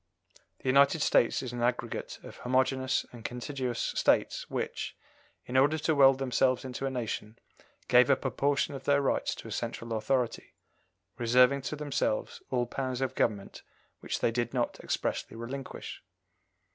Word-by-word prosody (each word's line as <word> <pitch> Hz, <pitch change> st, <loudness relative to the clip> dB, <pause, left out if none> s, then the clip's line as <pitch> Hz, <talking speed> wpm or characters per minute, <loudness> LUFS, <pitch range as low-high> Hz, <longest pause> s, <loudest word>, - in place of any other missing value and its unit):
The -, -, -9 dB
United 140 Hz, +3 st, +5 dB
States 120 Hz, -, +3 dB
is 125 Hz, -2 st, -5 dB
an 120 Hz, -, -4 dB
aggregate 120 Hz, -1 st, -2 dB
of -, -, -11 dB
homogeneous 130 Hz, +1 st, +1 dB
and 120 Hz, -2 st, -11 dB
contiguous 125 Hz, 0 st, -3 dB
States -, -, +1 dB
which, -, -, -4 dB, 0.5 s
in 125 Hz, -, -6 dB
order 145 Hz, +4 st, +4 dB
to 155 Hz, +1 st, +1 dB
weld 135 Hz, -2 st, +6 dB
themselves 130 Hz, -1 st, +1 dB
into 130 Hz, +1 st, -3 dB
a -, -, 0 dB
nation, 115 Hz, -3 st, -4 dB, 0.5 s
gave 125 Hz, +2 st, +6 dB
up 135 Hz, 0 st, +2 dB
a 130 Hz, -, +1 dB
portion 145 Hz, +1 st, +1 dB
of 135 Hz, -, -8 dB
their 140 Hz, 0 st, +4 dB
rights 140 Hz, -, 0 dB
to -, -, -10 dB
a -, -, -8 dB
central 115 Hz, 0 st, -4 dB
authority, 120 Hz, +2 st, -1 dB, 0.6 s
reserving 125 Hz, +3 st, +4 dB
to 145 Hz, -, -4 dB
themselves 145 Hz, -7 st, -2 dB
all 125 Hz, -2 st, +1 dB
powers 130 Hz, +1 st, -3 dB
of 130 Hz, -, -1 dB
government 100 Hz, -4 st, -1 dB, 0.4 s
which -, -, -4 dB
they -, -, +2 dB
did 120 Hz, +1 st, -2 dB
not 120 Hz, -1 st, -1 dB
expressly 115 Hz, -, -3 dB
relinquish. 130 Hz, +4 st, -7 dB
130 Hz, 160 wpm, -30 LUFS, 120-135 Hz, 0.6 s, weld